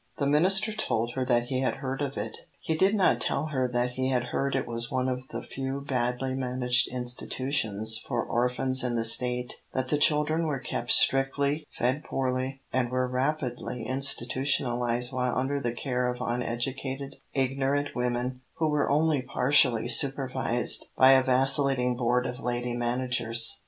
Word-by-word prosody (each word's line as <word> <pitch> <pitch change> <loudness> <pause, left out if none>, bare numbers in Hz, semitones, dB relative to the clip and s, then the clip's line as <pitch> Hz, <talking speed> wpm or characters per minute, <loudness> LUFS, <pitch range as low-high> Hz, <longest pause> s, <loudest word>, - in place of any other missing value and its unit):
The 140 - -1
minister 190 +9 +4
told 120 - -1
her 130 - -2
that 120 -1 0
he 130 -2 -1
had 130 - -1
heard 135 +1 -5
of 140 -1 -4
it. - - -5 0.2
He 160 - -3
did 190 +6 +2
not 195 -3 +2
tell - - 0
her 130 -4 -1
that 125 0 -1
he 130 +1 -2
had 125 -2 -1
heard 140 0 -1
it 135 - -1
was 115 +1 -1
one 130 -2 -1
of 130 0 -4
the - - -7
few 135 +1 -5
badly 130 -1 -2
managed 125 0 +1
institutions 120 -3 0
for - - -3
orphans 125 +2 +1
in 125 -1 -1
the 115 -1 -1
State, 125 +1 +4
that 130 -1 -2
the 150 - 0
children 155 +2 +2
were 145 -3 -2
kept - - -5
strictly, 140 +3 +3
fed 130 +5 -2
poorly, 130 +1 -3
and 130 -2 0
were 130 0 -1
rapidly 125 -3 -3
"institutionalised" 125 -2 +1
while 125 -1 -1
under 135 +2 -1
the 120 -3 -2
care 125 -1 -2
of 125 - -7
uneducated, 130 +3 -3 0.2
ignorant 135 +2 -1
women, 125 +1 -2
who 160 -1 0
were 150 -1 0
only 150 -1 +1
partially 125 -2 +2
supervised 130 -2 +2
by 130 0 +7
a 135 0 +6
vacillating 130 -1 +3
board 125 +1 0
of 125 +1 -5
lady 120 -1 -3
managers. 120 -1 -1
130 Hz, 165 wpm, -27 LUFS, 125-135 Hz, 0.2 s, by